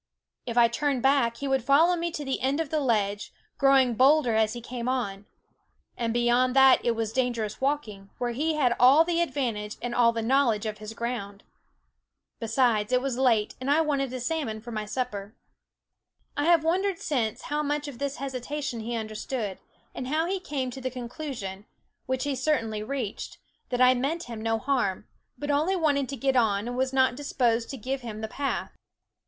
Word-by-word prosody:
If 235 0 -3
I 240 - +8
THE 235 - +4
WOODS 235 - -4
turned 285 -4 0
back, 265 -4 +3
he 280 - -4
would 270 -2 +1
follow 315 +7 +5
me 340 0 -2
to 295 -3 -4
the 270 - -2
end 270 +3 +1
of 320 -3 -2
the 310 - +1
ledge, 210 -6 0 0.3
growing 270 -3 +5
bolder 265 +1 +4
as 220 0 +2
he 240 - -6
came 240 +1 -4
on; 205 -6 -2 0.7
and 230 -1 -1
beyond 240 +2 +2
that 265 -1 +6
it 235 -1 +1
was 225 -1 -2
dangerous 235 -4 -1
walking, 225 -9 -2
where 245 -1 -1
he 305 +6 0
had 250 -5 +2
all 270 +6 +7
the 340 0 0
advantage 230 -10 -2
and 245 0 -4
all 235 -1 +4
the 230 -1 -3
knowledge 235 -3 +2
of 215 -1 -4
his 215 +1 -8
ground. 220 -4 -4 1.0
Besides, 225 -2 +1
it 250 - +4
was 260 -1 -3
late, 230 -5 +2
and 260 - -2
I 300 +3 +4
wanted 280 -4 0
a 255 - -4
salmon 250 -4 -2
for 240 +2 -9
my 215 -1 -3
supper. 210 -2 -4 1.0
I 290 0 0
have 335 -2 +5
wondered 370 +3 +1
since 235 -10 -2
how 295 +1 -1
much 295 0 -2
of 265 -4 -8
this 280 0 -2
hesitation 270 -1 -4
he 235 +2 -4
understood; 215 -1 -4 0.3
and 255 - -5
how 310 +4 +1
he 380 +2 -1
came 275 -7 -3
to 265 - -8
the 255 - -2
conclusion, 240 -6 -6 0.4
which 260 0 -1
he 285 -1 -1
certainly 230 -7 0
reached, 240 -2 -4 0.3
that 245 0 -1
I 255 0 +7
meant 280 +7 -1
him 230 -2 -7
no 225 0 0
harm, 220 -6 -1 0.3
but 290 0 -2
only 310 +7 +2
wanted 285 -6 +1
to 275 - -4
get 270 +2 +1
on 215 -3 +2
and 245 - -4
was 260 +1 0
not 260 -1 +3
disposed 240 -4 0
to 270 - -5
give 260 +4 -3
him 220 -3 -7
the 220 - -3
path. 275 +5 -3
255 Hz, 200 wpm, -27 LUFS, 225-280 Hz, 1.0 s, I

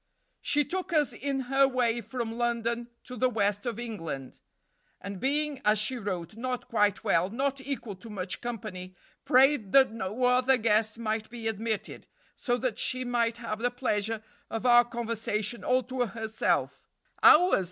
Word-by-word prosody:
"She 295 0 +2
took 370 +5 -4
us 300 -3 +2
in 275 0 -2
her 270 +2 +3
way 240 -3 +1
from 230 +1 -4
London 235 0 -1
to 250 - -9
the 255 +2 +2
west 205 -1 0
of 235 - -2
England, 165 - -6 0.6
and 200 -1 -7
being, 290 +2 0
as 210 +1 +4
she 215 +5 0
wrote, 195 -3 -4
'not 250 +1 -4
quite 210 -5 +1
well, 170 +3 +2
not 270 +4 -2
equal 255 -7 -5
to 225 +5 -12
much 190 -3 -5
company, 185 -6 -6 0.3
prayed 260 -5 +4
that 270 -3 +6
no 220 +2 -4
other 250 +1 +4
guest 220 -1 +1
might 220 -1 -2
be 230 -1 -5
admitted, 220 0 -3 0.3
so 245 -1 -1
that 250 -2 -2
she 255 0 0
might 235 -1 0
have 230 -2 -5
the 245 +2 +1
pleasure 225 -3 -2 0.3
of 225 +2 -4
our 240 -1 +7
conversation 230 -2 -3
all 255 0 +2
to 255 0 -2
herself 220 +1 -2 0.3
(_ours! 360 - +7
235 Hz, 165 wpm, -28 LUFS, 215-255 Hz, 0.6 s, our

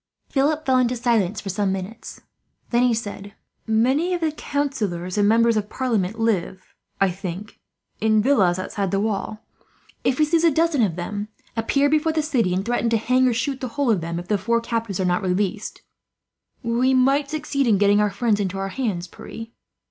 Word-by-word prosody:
Philip 300 +3 +1
fell 260 -1 +3
into 250 0 +1
silence 225 -5 +1
for 200 - -6
some 195 0 0
minutes, 195 +4 -6 0.5
then 240 0 +3
he 250 0 +4
said: 205 -2 -6 0.3
"Many 260 +11 +2
of 345 - -5
the 320 -1 +1
councillors 215 - -3
and 205 -1 +3
members 230 +1 +4
of 210 -1 -1
parliament 225 -6 -1
live, 190 -4 -1 0.3
I 195 -1 +3
think, 190 +2 -7 0.4
in 220 0 +3
villas 205 -8 +3
outside 195 +1 -3
the 195 - 0
walls. 215 0 -2 0.7
If 255 - +1
we 305 - +4
seize 330 +2 +1
a 335 - +6
dozen 320 -2 +2
of 190 -7 +1
them, 205 +4 -4 0.3
appear 275 +5 +2
before 310 +2 +2
the 310 -1 0
city, 250 -11 +1
and 185 +2 -1
threaten 235 0 0
to 230 - +2
hang 255 +4 +2
or 245 - +2
shoot 260 +3 -2
the 255 - -2
whole 280 -4 +2
of 195 -6 +1
them, 170 +1 -4
if 175 +1 -6
the 210 -1 +1
four 235 +4 +1
captives 230 -4 -3
are 190 - +1
not 180 0 +1
released, 195 +2 -2 0.8
we 245 +3 +2
might 275 +2 +3
succeed 280 -3 -1
in 215 -3 +4
getting 205 +1 +4
our 210 - +2
friends 205 +1 0
into 195 -1 -2
our 195 0 -3
hands, 200 -7 -2
Pierre." 225 +5 -9
225 Hz, 195 wpm, -23 LUFS, 195-260 Hz, 0.8 s, a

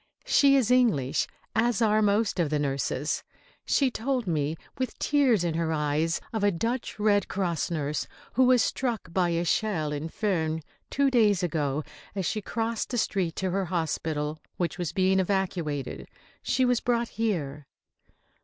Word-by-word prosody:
She 275 -1 +5
is 250 -3 +2
English, 215 - +3 0.3
as 235 +2 +2
are 215 -2 +3
most 210 -1 +2
of 165 -4 +2
the 150 - +1
nurses. 140 0 -1 0.4
She 270 -3 +3
told 250 +1 -1
me 155 -2 -1 0.2
with 255 - -2
tears 265 - +3
in 170 -2 0
her 165 0 -1
eyes 155 +2 0
of 220 -2 -1
a 205 - +5
Dutch 230 +7 -2
Red 205 -2 +2
Cross 180 -4 -1
nurse 150 -3 -2 0.3
who 260 +2 +4
was 250 -1 +5
struck 230 -10 -2
by 180 -1 +2
a 170 0 0
shell 170 -5 0
in 150 +2 -4
Furnes, 160 -6 -1 0.3
two 280 -1 +2
days 210 -6 +3
ago, 150 -4 -1 0.3
as 190 -2 -2
she 215 - -1
crossed 225 +2 -2
the 245 - -2
street 185 -7 0
to 190 -1 -1
her 195 +1 0
hospital, 155 -3 -2 0.2
which 175 +1 -2
was 175 -4 -2
being 190 -1 +2
evacuated. 180 -7 -2 0.3
She 260 - +1
was 245 -1 +2
brought 235 -1 0
here. 150 -11 -2
190 Hz, 165 wpm, -27 LUFS, 160-225 Hz, 0.4 s, She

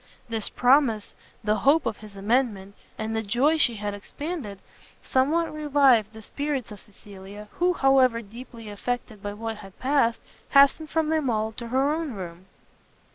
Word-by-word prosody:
This 225 -2 -3
promise, 245 -4 +2 0.3
the 210 0 +1
hope 280 +9 +3
of 225 -2 -2
his 210 -1 -13
amendment, 205 -2 0 0.2
and 220 +1 -3
the 220 - 0
joy 245 +9 +2
she 240 -5 +3
had 205 -1 -4
expanded, 245 - -6 0.5
somewhat 305 +6 +1
revived 275 -8 +3
the 220 0 -11
spirits 280 -2 -3
of 205 - -8
Cecilia; 205 +1 -12
who, 360 +1 +1
however, 260 -6 +3
deeply 230 +1 -11
affected 215 0 -4
by 205 0 -4
what 225 +1 -5
had 195 -3 -13
passed, 260 -4 +1 0.3
hastened 280 +2 +5
from 320 -1 0
them 310 -4 +1
all 220 -1 0
to 235 +2 -7
her 265 +4 +1
own 315 -4 -3
room. 180 -2 -8
230 Hz, 160 wpm, -25 LUFS, 210-280 Hz, 0.5 s, hastened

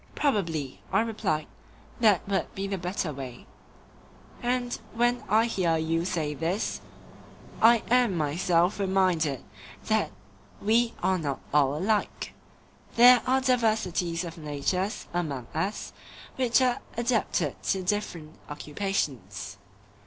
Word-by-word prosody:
Probably, 165 - -1
I - - +4
replied, 210 -9 -1 0.5
that 210 -7 +4
would 195 -1 -1
be 195 - -3
the 195 -1 -3
better 180 -3 -2
way; 130 -3 -8 1.0
and 245 0 0 0.2
when 240 +1 +2
I 220 +3 +4
hear 180 -8 +1
you 165 +1 0
say 160 -5 -1
this, 165 +7 -2 0.8
I 230 0 +6
am 245 -7 +4
myself 170 +5 +1
reminded 185 -8 +1 0.4
that - - +1 0.5
we 230 +3 +2
are 185 -1 +2
not 145 -4 -2
all 145 -1 +3
alike; 205 +5 -1 0.6
there 245 +1 +8
are 260 +1 +3
diversities 215 -9 +1
of 170 -1 -7
natures 160 - -2
among 145 -8 -2
us 190 +7 -3 0.4
which 255 0 +3
are 250 -1 +1 0.2
adapted 225 - 0
to 190 -1 0
different 180 -5 -3
occupations. 145 - -3
185 Hz, 115 wpm, -27 LUFS, 155-225 Hz, 1.0 s, there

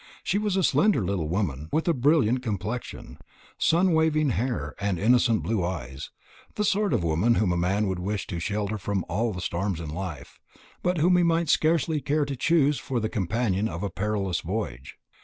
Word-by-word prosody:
She 200 - 0
was 210 -2 -1
a 190 - +2
slender 150 - +3
little 90 -5 -2
woman, 80 -6 -2
with 160 - 0
a 170 - +4
brilliant 130 -3 +2
complexion, 110 +1 -5 0.4
sunny 175 +2 +3
waving 155 -3 +2
hair, 120 +1 -2
and 100 -3 -1
innocent 115 -1 +3
blue 100 +1 0
eyes; 70 -7 -5 0.5
the 210 - 0
sort 205 0 +1
of - - +1
woman 85 +9 +2
whom 105 -5 +2
a - - +1
man 95 +5 +1
would 95 -2 -2
wish 100 +2 -3
to 85 - -5
shelter 105 +3 -2
from 100 -2 -2
all 110 +5 0
the 90 -2 -6
storms 90 +1 -2
of 80 -3 -6
life, 85 -2 -7 0.4
but 180 0 0
whom 180 +3 +4
he - - +4
might 165 -1 +1
scarcely 155 -1 +2
care 150 +1 +1
to 140 -1 -4
choose 150 0 +2
for 130 -3 -2
the 110 -1 -2
companion 105 0 0
of 85 +3 -5
a 100 - -2
perilous 100 -3 -1
voyage. 80 - -5
110 Hz, 195 wpm, -26 LUFS, 90-150 Hz, 0.5 s, a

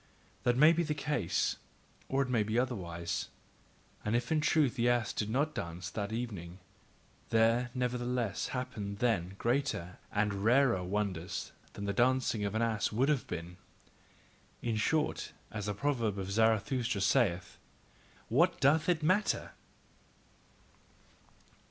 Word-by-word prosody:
That 120 0 +2
may 155 +4 +7
be 170 - +1
the 155 -2 -1
case, 145 - 0 0.5
or 135 +1 +2
it - - -5
may 120 -3 +2
be 110 +2 -1
otherwise; 85 -10 -2 0.8
and 105 +2 0
if 120 +3 -1
in 155 -1 +3
truth 150 -4 +3
the 120 -1 +2
ass 120 -3 +1
did 105 - -2
not 145 +6 0
dance 85 - -5
that 100 -1 -3
evening, 100 -7 -5 0.7
there 115 +2 +3
nevertheless 125 -3 -1
happened 110 -6 -4
then 100 -6 0
greater 120 -8 -1
and 100 -1 0
rarer 120 -4 +4
wonders 95 -2 -3 0.2
than 100 - -6
the 100 - -1
dancing 125 -1 +2
of 100 +1 -2
an 115 - +2
ass 110 -3 0
would 125 +6 +2
have 145 -4 +1
been. 85 +1 -6 1.1
In 115 -2 0
short, 150 +8 0 0.2
as 105 -2 -4
the 105 - -2
proverb 115 -5 0
of 95 0 -4
Zarathustra 110 +1 +1
saith: 95 -4 +1 0.7
"What 165 +10 +3
doth 155 +4 +3
it 165 -3 +1
matter!" 185 +7 +1
115 Hz, 140 wpm, -32 LUFS, 100-130 Hz, 1.1 s, may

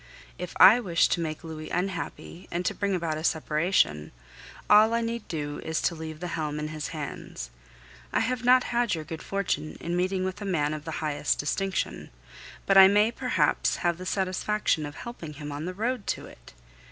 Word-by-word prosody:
If 180 0 -6
I 220 +6 +9
wished 175 -8 +2
to - - +2
make 155 -1 -4
Louis 155 -1 -7
unhappy 180 -1 -4
and 175 +1 -3
to - - +1
bring 200 -1 -1
about 165 -3 -2
a - - -7
separation, 155 - +1 0.6
all 215 +2 +6
I 235 - +1
need 230 -1 -3
do 145 -2 -4
is 160 0 -1
to - - +2
leave 160 -1 -7
the 180 - -3
helm 155 -3 -3
in 150 0 -3
his 155 -1 -4
hands. 145 - -6 0.6
I - - +2
have 250 +1 -1
not 255 +1 +6
had 240 -4 0
your 160 - -5
good 160 +1 -7
fortune 180 -6 -2
in 170 +1 -3
meeting 185 +1 0
with 185 +2 -4
a - - -4
man 155 -6 0
of 155 -1 -6
the 160 - -4
highest 145 -1 0
distinction, 190 +6 -2 0.6
but 195 -1 +6
I 190 - +11
may 210 +3 +4
perhaps - - +1
have 170 0 +1
the 185 - -6
satisfaction 190 -4 0
of 145 - -10
helping 175 -10 -8
him 145 0 -7
on 145 +2 -5
the 185 - -4
road 230 +2 -2
to - - -10
it. - - -15
175 Hz, 200 wpm, -27 LUFS, 155-200 Hz, 0.6 s, I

